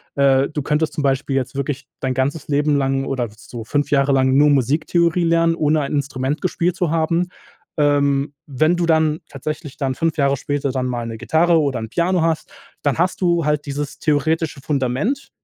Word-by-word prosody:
äh, 140 Hz, -1 st, +3 dB
du 150 Hz, -1 st, -3 dB
könntest 150 Hz, +3 st, 0 dB
zum -, -, -2 dB
Beispiel 135 Hz, 0 st, 0 dB
jetzt 135 Hz, 0 st, -2 dB
wirklich 140 Hz, 0 st, -3 dB
dein 130 Hz, -1 st, -1 dB
ganzes 140 Hz, +4 st, -2 dB
Leben 145 Hz, 0 st, +2 dB
lang 135 Hz, 0 st, 0 dB
oder 130 Hz, -3 st, -2 dB
so 115 Hz, +1 st, -9 dB
5 145 Hz, +4 st, -1 dB
Jahre 140 Hz, -1 st, +3 dB
lang 130 Hz, 0 st, +3 dB
nur 150 Hz, +1 st, +5 dB
Musiktheorie 160 Hz, +6 st, +2 dB
lernen, 165 Hz, 0 st, +3 dB
ohne 155 Hz, -1 st, +2 dB
ein 140 Hz, -, -3 dB
Instrument 140 Hz, 0 st, -2 dB
gespielt 175 Hz, -1 st, 0 dB
zu 175 Hz, -4 st, 0 dB
haben. 165 Hz, +2 st, +1 dB, 0.5 s
Ähm, 145 Hz, -1 st, +2 dB
wenn 155 Hz, +5 st, +2 dB
du 175 Hz, -, +1 dB
dann 160 Hz, -1 st, +2 dB
tatsächlich 150 Hz, +1 st, -6 dB
dann 135 Hz, -2 st, -1 dB
5 165 Hz, +2 st, 0 dB
Jahre 140 Hz, -1 st, +2 dB
später 145 Hz, 0 st, -2 dB
dann 130 Hz, -1 st, -2 dB
mal 120 Hz, -2 st, -3 dB
'ne 115 Hz, -1 st, -6 dB
Gitarre 160 Hz, +9 st, +3 dB
oder 140 Hz, -5 st, 0 dB
'n 110 Hz, -1 st, -6 dB
Piano 175 Hz, +5 st, +1 dB
hast, 160 Hz, -1 st, -1 dB, 0.3 s
dann 145 Hz, -2 st, +1 dB
hast 180 Hz, +2 st, +1 dB
du 170 Hz, -3 st, +2 dB
halt 150 Hz, -1 st, 0 dB
dieses 140 Hz, 0 st, -4 dB
theoretische 155 Hz, 0 st, 0 dB
Fundament, 140 Hz, -, -1 dB
145 Hz, 190 wpm, -20 LUFS, 135-160 Hz, 0.5 s, nur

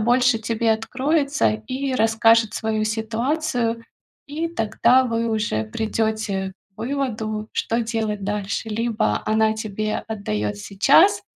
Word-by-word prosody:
больше 245 Hz, +1 st, +3 dB
тебе 225 Hz, 0 st, +1 dB
откроется 275 Hz, -, +1 dB, 0.2 s
и 265 Hz, 0 st, -2 dB
расскажет 225 Hz, -1 st, +4 dB
свою 220 Hz, -1 st, -1 dB
ситуацию. 230 Hz, +2 st, -1 dB, 0.4 s
И 315 Hz, +4 st, -3 dB
тогда 240 Hz, -1 st, +3 dB
вы 230 Hz, -1 st, -1 dB
уже 210 Hz, -, -1 dB
придёте 215 Hz, -, -2 dB, 0.2 s
к -, -, -41 dB
выводу, 225 Hz, -5 st, -3 dB
что 230 Hz, +1 st, 0 dB
делать 220 Hz, -3 st, -2 dB
дальше. 205 Hz, +2 st, -3 dB
Либо 225 Hz, +1 st, 0 dB
она 220 Hz, 0 st, +2 dB
тебе 215 Hz, 0 st, -3 dB
отдаёт 105 Hz, -, -2 dB
сейчас 320 Hz, -, +4 dB
225 Hz, 115 wpm, -22 LUFS, 215-245 Hz, 0.4 s, расскажет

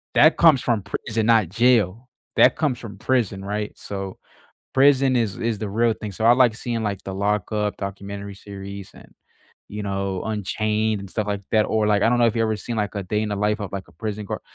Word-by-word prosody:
That 155 Hz, +2 st, +6 dB
comes 160 Hz, -6 st, +6 dB
from 115 Hz, -4 st, 0 dB
prison, 110 Hz, +2 st, -2 dB
not 110 Hz, -6 st, +4 dB
jail 115 Hz, 0 st, +2 dB, 0.3 s
that -, -, +6 dB
comes 150 Hz, -6 st, 0 dB
from 105 Hz, -5 st, -10 dB
prison, 115 Hz, -7 st, 0 dB
right? 105 Hz, +1 st, -3 dB
So, 95 Hz, -1 st, -6 dB, 0.5 s
prison 135 Hz, -1 st, +4 dB
is 115 Hz, -5 st, 0 dB
is 115 Hz, -1 st, -1 dB
the 105 Hz, -, -3 dB
real 115 Hz, +3 st, +2 dB
thing 105 Hz, -1 st, -7 dB
so, 110 Hz, +4 st, -3 dB
I 120 Hz, -, +8 dB
like 125 Hz, -3 st, +4 dB
seeing 115 Hz, -1 st, -3 dB
like 100 Hz, -3 st, -2 dB
the 95 Hz, -, -4 dB
Lockup 105 Hz, +1 st, -1 dB
documentary 100 Hz, 0 st, -6 dB
series 100 Hz, -1 st, -9 dB
and, -, -, -16 dB, 0.6 s
you 105 Hz, 0 st, -5 dB
know, 100 Hz, -2 st, -2 dB
Unchained 110 Hz, 0 st, -1 dB
and 100 Hz, -, -9 dB
stuff 105 Hz, 0 st, -2 dB
like 100 Hz, -1 st, -1 dB
that 110 Hz, -1 st, +4 dB
or, 110 Hz, -1 st, +1 dB
like 105 Hz, -1 st, +3 dB
I -, -, +5 dB
don't 120 Hz, 0 st, +2 dB
know 120 Hz, -, +5 dB
if 115 Hz, -, +1 dB
you've 115 Hz, -, +2 dB
ever 110 Hz, -1 st, 0 dB
seen 115 Hz, +2 st, -5 dB
like 105 Hz, -2 st, -1 dB
a 100 Hz, -, -2 dB
day 105 Hz, +3 st, -1 dB
in 110 Hz, -, -2 dB
the 105 Hz, -, -2 dB
life 105 Hz, +1 st, 0 dB
of 95 Hz, -, -5 dB
like 100 Hz, -1 st, -6 dB
a -, -, -20 dB
prison 105 Hz, -2 st, -5 dB
guard, -, -, -4 dB
105 Hz, 225 wpm, -23 LUFS, 100-115 Hz, 0.6 s, I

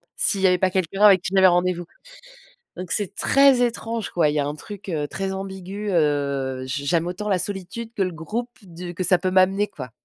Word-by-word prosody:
s'il 195 Hz, -, +1 dB
y 190 Hz, -, +5 dB
avait 180 Hz, 0 st, +3 dB
pas 185 Hz, 0 st, +1 dB
quelqu'un 190 Hz, +1 st, -2 dB
avec 195 Hz, -4 st, +7 dB
qui 180 Hz, -, -4 dB
j'avais 190 Hz, 0 st, +6 dB
rendez-vous. 175 Hz, 0 st, +1 dB, 0.9 s
Donc 180 Hz, -1 st, -7 dB
c'est 205 Hz, -4 st, -1 dB
très 275 Hz, -2 st, +4 dB
étrange 230 Hz, -2 st, -3 dB
quoi. 165 Hz, -4 st, +2 dB
Il 150 Hz, -, -1 dB
y 150 Hz, -, +1 dB
a 140 Hz, -, -1 dB
un 145 Hz, -, -3 dB
truc, 205 Hz, +5 st, -10 dB
heu, 150 Hz, -5 st, -2 dB
très 195 Hz, +6 st, -4 dB
ambigu, 195 Hz, +1 st, -6 dB
heu, 140 Hz, -4 st, 0 dB
j 140 Hz, +2 st, -4 dB
j'aime 170 Hz, +3 st, +1 dB
autant 185 Hz, +4 st, -4 dB
la 190 Hz, -, +2 dB
solitude 200 Hz, +5 st, -5 dB
que 200 Hz, -, 0 dB
le 180 Hz, -1 st, -1 dB
groupe 220 Hz, +10 st, -5 dB
du 175 Hz, -1 st, -9 dB
que 185 Hz, -, -3 dB
ça 180 Hz, 0 st, +5 dB
peut 185 Hz, +1 st, -1 dB
m'amener 190 Hz, +2 st, +3 dB
quoi. 130 Hz, -, -9 dB
185 Hz, 220 wpm, -23 LUFS, 165-200 Hz, 0.9 s, avec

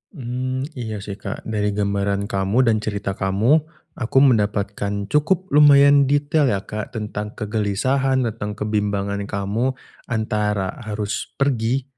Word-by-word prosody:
Mmm. 130 Hz, -1 st, -3 dB
Iya 110 Hz, -4 st, -5 dB
sih, 100 Hz, 0 st, -7 dB
Kak. 100 Hz, +1 st, -6 dB
Dari 105 Hz, -2 st, -1 dB
gambaran 100 Hz, 0 st, -1 dB
kamu 100 Hz, +6 st, +2 dB
dan 115 Hz, -3 st, +2 dB
cerita 105 Hz, -1 st, -3 dB
kamu 100 Hz, +10 st, +2 dB, 0.4 s
aku 120 Hz, +2 st, -1 dB
mendapatkan 100 Hz, -4 st, 0 dB
cukup 185 Hz, +5 st, +1 dB
lumayan 140 Hz, -1 st, +6 dB
detail 145 Hz, +1 st, +2 dB
ya, 100 Hz, -5 st, 0 dB
Kak, 105 Hz, +3 st, -6 dB
tentang 105 Hz, -1 st, -5 dB
kegelisahan, 125 Hz, +6 st, 0 dB
tentang 105 Hz, -3 st, -4 dB
kebimbangan 105 Hz, -2 st, -1 dB
kamu 105 Hz, +7 st, -1 dB, 0.3 s
antara 105 Hz, -4 st, -1 dB
harus 105 Hz, -2 st, -4 dB
pergi 130 Hz, -1 st, 0 dB
105 Hz, 125 wpm, -21 LUFS, 100-130 Hz, 0.4 s, lumayan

